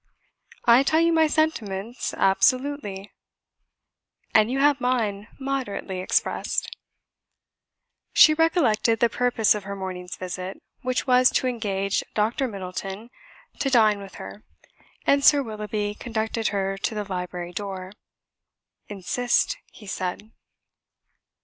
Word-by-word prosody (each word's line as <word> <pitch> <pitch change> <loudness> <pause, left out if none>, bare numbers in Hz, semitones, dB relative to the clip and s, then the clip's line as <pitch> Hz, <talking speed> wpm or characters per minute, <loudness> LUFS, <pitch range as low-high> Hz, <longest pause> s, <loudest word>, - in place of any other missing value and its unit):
"I 235 +2 +7
tell 315 +3 +2
you 335 0 +3
my 320 -1 +4
sentiments 235 -8 -1
absolutely." 210 -1 +1 1.2
"And 215 +1 +5
you 260 - -1
have 280 -1 +3
mine 215 -5 -1
moderately 260 -8 -3
expressed." 185 - -1 1.4
She 310 - +7
recollected 285 - +2
the 235 - +3
purpose 245 -2 +2
of 210 -2 -6
her 200 0 -5
morning's 185 -2 -6
visit, 185 +1 -6 0.2
which 255 0 -1
was 255 -1 +5
to - - +1
engage 200 -5 -1
Dr. 225 +5 +1
Middleton 195 +2 -6 0.5
to 275 - 0
dine 215 -5 +4
with 195 -1 -11
her, 100 +2 -9 0.6
and 280 0 +3
Sir 285 0 +6
Willoughby 210 -2 -3
conducted 220 0 -2
her 195 -1 -2
to 220 - -2
the 210 - -2
library 180 -2 -5
door. 190 -1 -5 1.0
"Insist," 245 - 0
he 215 - -14
said. 190 +3 -4
215 Hz, 120 wpm, -24 LUFS, 195-255 Hz, 1.4 s, I